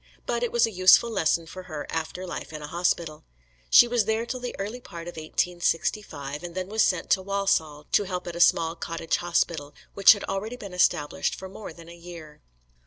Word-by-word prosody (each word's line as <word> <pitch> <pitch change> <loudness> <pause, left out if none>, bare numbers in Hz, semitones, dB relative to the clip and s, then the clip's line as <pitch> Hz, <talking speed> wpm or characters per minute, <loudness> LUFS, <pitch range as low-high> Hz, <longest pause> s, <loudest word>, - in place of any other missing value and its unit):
But 235 0 -1
it 240 - -1
was 235 0 +4
a 225 - -4
useful 185 +5 +5
lesson 165 -4 +1
for 185 +3 -9
her 155 -2 -5
after 165 +3 -4
life 175 - -6
in 155 -1 -7
a - - -6
hospital. 170 -2 -1 0.5
She 240 - +8
was 235 -3 +1
there 220 +2 0
till 255 +1 -4
the 245 0 -5
early 210 +5 -4
part 170 -6 -9
of 175 - -6
1865, 160 -2 -2
and 175 -1 -8
then 185 0 -4
was 220 +1 +1
sent 180 -4 +1
to 190 - +4
Walsall 190 -7 -1
to 205 - +3
help 180 -1 -4
at 175 -1 -6
a - - -5
small 165 -1 +4
cottage 165 -1 -2
hospital, 165 -4 -1 0.2
which 200 +1 +8
had 205 - -7
already 210 +5 -3
been 200 -5 -9
established 170 -4 +1
for 190 - -8
more 195 +1 -9
than 165 0 -14
a 170 - -11
year. 170 -3 -11
175 Hz, 210 wpm, -26 LUFS, 165-200 Hz, 0.5 s, She